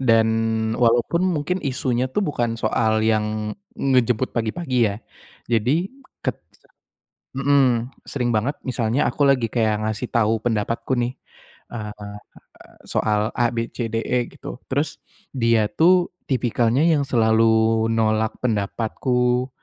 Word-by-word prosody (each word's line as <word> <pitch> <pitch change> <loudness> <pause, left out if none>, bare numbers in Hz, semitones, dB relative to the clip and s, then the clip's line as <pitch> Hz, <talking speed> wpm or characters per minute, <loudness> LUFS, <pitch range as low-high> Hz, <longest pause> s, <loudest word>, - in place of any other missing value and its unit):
dan 115 -3 +4 0.5
walaupun 120 +9 +2
mungkin 180 0 0
isunya 130 -2 -1
itu 130 - -3
bukan 120 -6 -1
soal 110 -2 +1
yang 110 -1 0 0.2
ngejemput 125 -2 +1
pagi-pagi 125 +5 -2
ya. - - -4 0.5
Jadi 125 - +1 0.4
ket - - -2 1.0
mhm, 135 -3 +2 0.2
sering 125 -3 -1
banget 125 +7 0
misalnya 120 +1 0
aku 135 - -1
lagi 130 -4 +3
kayak 110 -2 +1
ngasih 110 +3 -3
tahu 110 -1 +1
pendapatku 115 +2 -1
nih, 120 +1 0 0.6
eee, 105 -2 -7 0.7
soal 105 -1 0
ABCDE 115 0 -1
gitu, 125 - -9
terus 140 +3 0 0.5
dia 115 -3 +2
tuh 175 +2 +4 0.2
tipikalnya 125 +1 +1
yang 155 -4 +3
selalu 110 -2 +3 0.5
nolak 110 -1 +1
pendapatku, 125 +3 0
120 Hz, 110 wpm, -22 LUFS, 110-130 Hz, 1.0 s, dan